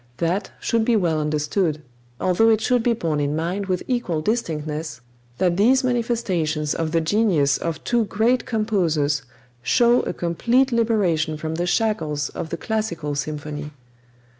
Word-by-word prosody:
That 175 +6 -1
should 230 -1 +1
be 235 +1 +2
well 170 -6 +1
understood, 150 +2 0 0.4
although 185 +5 +3
it 220 -1 +4
should 245 +2 +2
be 235 +1 +2
borne 165 -9 -1
in 145 +1 0
mind 180 +5 -2
with 185 -2 -1
equal 240 -11 -1
distinctness 155 - -2 0.4
that 180 -2 +1
these 260 +6 +4
manifestations 205 - 0
of 160 -1 -2
the 165 0 +2
genius 160 -6 +2
of 165 -2 -4
two 235 -2 +1
great 230 +6 +1
composers 175 - +1 0.4
show 240 - +4
a - - -2
complete 235 +10 +1
liberation 190 -10 +1
from 155 +1 -4
the 175 +2 -2
shackles 160 - 0
of 160 - -6
the 170 - -3
classical 190 -10 -2
symphony. 150 +1 -5
175 Hz, 150 wpm, -22 LUFS, 155-225 Hz, 0.4 s, it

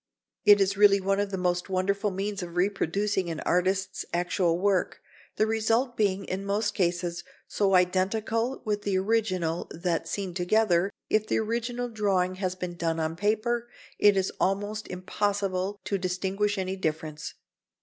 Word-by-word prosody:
It 205 -1 +8
is 195 0 +1
really 200 -1 +6
one 195 +1 0
of 205 0 0
the 195 - -3
most 180 0 -1
wonderful 195 +2 0
means 195 +1 -3
of 175 -1 -7
reproducing 195 0 0
an 160 -2 -4
artist's 190 +2 0
actual 175 -1 +1
work, 195 0 +1 0.4
the 215 - +3
result 225 +3 +1
being, 200 -2 +1
in 190 +1 -3
most 205 +1 0
cases, 175 -2 -1 0.2
so 195 -2 +2
identical 215 +7 +1
with 210 -1 -1
the 200 -2 0
original 185 -5 0
that, 170 0 -2
seen 195 -3 -3
together, 180 0 +2 0.2
if 215 0 +2
the - - +1
original 235 +2 -2
drawing 195 -5 0
has 185 -1 -1
been 180 -1 -5
done 165 -1 -1
on 160 0 -1
paper, 220 +5 0 0.3
it 205 -1 +5
is 190 0 +1
almost 205 +3 -1
impossible 195 +1 -2
to 200 - -1
distinguish 190 +3 -1
any 190 0 -2
difference. 155 -3 -4
195 Hz, 155 wpm, -27 LUFS, 180-210 Hz, 0.4 s, It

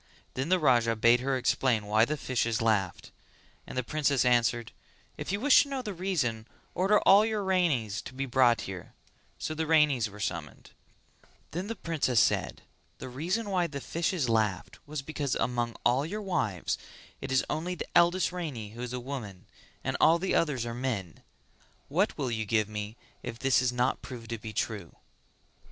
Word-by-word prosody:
Then 135 +5 -3
the 185 - +5
Raja 120 -7 +3
bade 115 +2 +5
her 135 +1 0
explain 125 -3 +1
why 110 +2 +4
the 150 +4 -2
fishes 115 -4 -1
laughed, 105 -5 0 0.6
and - - -7
the 130 - +1
princess 145 -2 +1
answered 120 -1 +2 0.4
"If - - -5
you 200 - -1
wish 280 +4 +6
to 285 - -3
know 270 -2 -3
the 210 -4 -4
reason 145 - -1 0.3
order 195 +3 +3
all 200 +2 +7
your 215 -2 -1
Ranis 160 - +1
to 130 - -9
be 135 +1 -2
brought 125 -2 +3
here;" 95 -3 -8 0.4
so 155 - -3
the 160 0 -2
Ranis 150 -8 +3
were 105 +1 -12
summoned; 85 -7 -5 0.8
then 180 +5 -4
the 230 - -4
princess 155 - 0
said - - +1 0.3
"The - - -7
reason 175 - -2
why 180 -2 +2
the 145 -3 -6
fishes 165 -1 -1
laughed 110 -5 0
was 150 -2 -5
because 145 -3 -2
among 120 0 -1
all 125 +3 +3
your 205 +7 -4
wives 115 - -1 0.4
it - - -5
is 130 - +2
only 175 +3 -2
the - - -5
eldest 175 +2 +4
Rani 145 -13 -5
who 120 +2 -9
is 125 0 -5
a 125 - -2
woman 120 -8 -7 0.4
and - - -1
all 165 - +6
the 185 +2 -1
others 140 -7 +1
are 115 - -4
men. 115 -9 -4 0.7
What 185 +9 +1
will 135 -5 -2
you 110 -1 -2
give 110 -1 +1
me 105 +1 -6 0.2
if 120 -2 -6
this 135 0 +3
is 125 -1 +1
not 125 +1 0
proved 115 -3 -9
to 115 - -3
be 110 +1 -7
true?" 105 -5 -3
130 Hz, 185 wpm, -29 LUFS, 115-165 Hz, 0.8 s, all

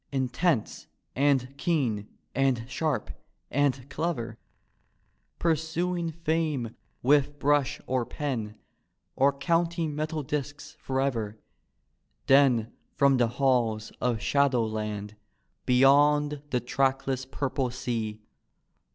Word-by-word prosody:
Intense 135 0 0 0.3
and 135 -1 +2
keen 125 - 0 0.3
and 130 -3 +1
sharp 150 +1 -2 0.4
and 135 -1 +1
clever, 120 -10 -3 1.0
Pursuing 170 +2 0
fame 155 -7 -1 0.3
with 145 +2 +3
brush 145 -1 +2
or 130 -1 0
pen, 115 -6 -4 0.6
Or 140 +2 +4
counting 165 +2 0
metal 155 0 -2
disks 145 +1 -5
forever, 125 -6 -2 0.9
Then 130 -5 +4 0.2
from 140 -1 +4
the 120 -1 +3
halls 120 -5 +1
of 120 -3 +1
Shadowland, 110 -6 0 0.5
Beyond 145 +3 +4
the 125 -2 0
trackless 130 +1 0
purple 135 -1 -2
sea. 115 -4 -4
135 Hz, 90 wpm, -28 LUFS, 120-150 Hz, 1.0 s, Or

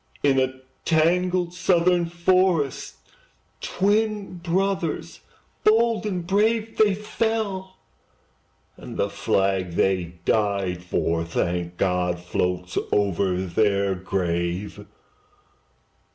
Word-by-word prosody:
In 135 -2 +4
a 130 0 -1 0.2
tangled 175 +2 +2
Southern 180 -1 +2
forest, 175 -4 +1 0.7
Twin 205 -1 0
brothers 185 0 -1 0.4
bold 225 0 +3
and 180 -4 -3
brave, 220 +4 +1
They 210 -3 +4
fell; 210 -3 -2 1.0
and - - -9
the 100 - 0
flag 95 -2 0
they 90 -2 0
died 100 -4 0
for, 85 -2 0
Thank 85 +1 -2
God! 90 -2 0
floats 90 +1 -2
over 100 -2 +1
their 100 +1 +1
grave. 90 +1 -3
145 Hz, 90 wpm, -24 LUFS, -, 1.0 s, In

